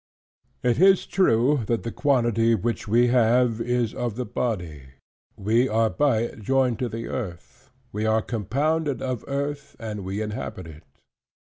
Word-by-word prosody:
It 125 +2 +2
is 190 0 +5
true, 140 -6 +3
that 115 -1 0
the 115 - -4
quantity 120 -5 +2
which 115 +2 -3
we 120 +3 +4
have, 120 -1 +3
is 120 -1 0
of 120 -4 -3
the 125 +1 -3
body: 80 - -4 0.4
we 115 +6 +2
are 110 0 +2
by 140 -7 +2
it 115 - -5
joined 130 +1 +1
to 125 - -1
the 115 +1 -5
earth: 90 -9 -7 0.2
we 105 +2 -2
are 110 0 +2
compounded 140 - -1
of 130 -3 -3
earth; 140 +1 -4
and 105 -3 -6
we 95 +2 -4
inhabit 105 -4 -5
it. 80 0 -12
115 Hz, 155 wpm, -24 LUFS, 110-130 Hz, 0.4 s, is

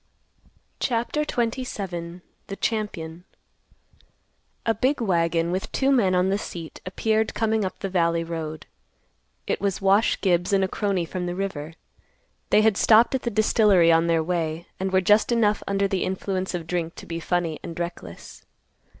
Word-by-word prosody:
CHAPTER 240 +4 0
XXVII. 200 - -3 0.3
THE 195 - -5
CHAMPION. 180 -7 -3 1.4
A 225 - +3
big 260 +7 0
wagon, 170 -5 +1
with 185 +1 -3
two 270 0 +1
men 200 -9 +3
on 180 +1 +2
the 200 +1 +1
seat, 165 -6 -8
appeared 220 +3 0
coming 220 -1 +1
up 190 - -4
the 195 - -4
valley 170 -3 +1
road. 160 -2 -5 0.8
It - - -2
was 200 -2 0
Wash 195 +3 +3
Gibbs 180 0 +1
and 195 -1 +4
a - - +2
crony 195 -3 -1
from 180 +2 -4
the 175 - -3
river. 170 -5 -4 0.8
They 215 - +5
had 220 -2 +3
stopped 225 +3 +5
at 265 - 0
the 235 - -2
distillery 205 -5 +4
on 165 +1 +3
their 165 -1 +2
way, 165 -1 -2
and 190 0 -2
were 190 0 +3
just 210 +5 +3
enough 215 -3 +2
under 200 0 +1
the 190 -1 -1
influence 190 0 -2
of 170 -2 -4
drink 170 0 -3
to - - -10
be 165 0 -5
funny 170 -2 -1
and 165 0 -7
reckless. 170 - -7
190 Hz, 165 wpm, -24 LUFS, 170-215 Hz, 1.4 s, They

